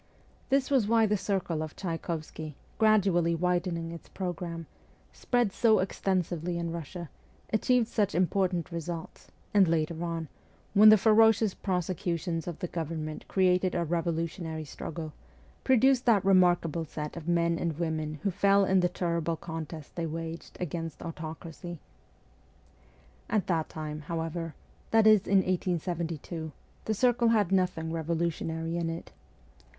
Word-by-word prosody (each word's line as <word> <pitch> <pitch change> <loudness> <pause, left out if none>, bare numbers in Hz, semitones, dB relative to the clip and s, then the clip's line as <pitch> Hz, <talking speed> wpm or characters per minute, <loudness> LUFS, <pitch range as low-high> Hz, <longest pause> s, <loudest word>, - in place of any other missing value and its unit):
This 275 0 +2
was 255 -7 +3
why 225 0 +4
the 210 0 +2
circle 185 -5 -1
of 155 -1 -5
Tchaykovsky, 160 -3 -5 0.2
gradually 195 -6 +4
widening 175 -1 -1
its 170 -2 -10
programme, 170 -2 -4 0.5
spread 240 -5 0
so 220 -2 +4
extensively 180 -2 -1
in 170 -1 -2
Russia, 170 0 -6 0.4
achieved 240 +1 +3
such 210 -8 0
important 180 -1 +1
results, 170 0 -6 0.3
and 200 -3 +6
later 165 0 0
on, 165 -2 -3 0.5
when 215 +1 +9
the 215 - +9
ferocious 220 -1 +5
prosecutions 175 -2 -2
of 175 - -4
the 180 - -3
government 160 -2 -4
created 185 -1 +2
a 175 - +1
revolutionary 165 -1 -2
struggle, 155 +1 -6 0.5
produced 260 0 +4
that 205 -5 +4
remarkable 175 -4 +3
set 150 -1 -6
of 170 -1 -8
men 170 -1 +2
and 165 -3 -2
women 160 -2 -2
who 200 - +1
fell 200 +2 +4
in 190 0 +3
the 180 0 +2
terrible 170 -2 -1
contest 160 -2 -7
they 170 -1 -2
waged 165 +1 -6
against 165 -2 -4
autocracy. 165 +1 -7 1.5
At 205 -5 +1
that 165 -4 0
time, 155 -1 -5
however 165 +1 -4 0.3
that 225 -1 +4
is, 215 -3 +6
in 195 -1 +4
1872 170 -3 -2 0.3
the 220 - 0
circle 240 +1 +3
had 210 -5 +3
nothing 180 -4 +1
revolutionary 165 0 -2
in 170 -1 -1
it. 165 0 -6
170 Hz, 135 wpm, -29 LUFS, 165-195 Hz, 1.5 s, when